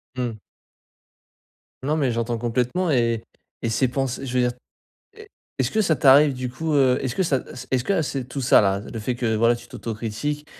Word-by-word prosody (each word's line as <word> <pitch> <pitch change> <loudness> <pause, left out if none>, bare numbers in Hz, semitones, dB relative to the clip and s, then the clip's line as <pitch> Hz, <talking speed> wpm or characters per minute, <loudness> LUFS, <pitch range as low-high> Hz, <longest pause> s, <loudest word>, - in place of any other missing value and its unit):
Mmh. 120 -4 -3 1.4
Nan 150 +3 0
mais 135 -5 +1
j'entends 115 0 -1
complètement 125 +9 0
et 115 -4 +1 0.4
et 115 - -1
c'est 125 +3 +2
pense 130 0 -2
je 130 - -5
veux 125 - +3
dire, 125 0 +2 0.6
est 435 -1 -13 0.3
est-ce - - +1
que 220 - +1
ça 170 -6 +2
t'arrive 140 +2 +6
du 125 -1 -4
coup, 155 +4 -2
heu, 130 -2 +4
est-ce 130 -2 -2
que - - +1
ça 150 -7 +1
es - - -11 0.2
est-ce 125 - +1
que 200 - +1
à 165 - +2
c'est 135 -3 -3
tout 135 +1 -4
ça 125 - +6
là, 100 -1 +1
le 110 +1 -8
fait, 125 +4 -2
que 120 -2 -1
voilà 115 +2 +3
tu - - -13
t'autocritiques, 115 +7 -4
125 Hz, 210 wpm, -23 LUFS, 115-145 Hz, 1.4 s, t'arrive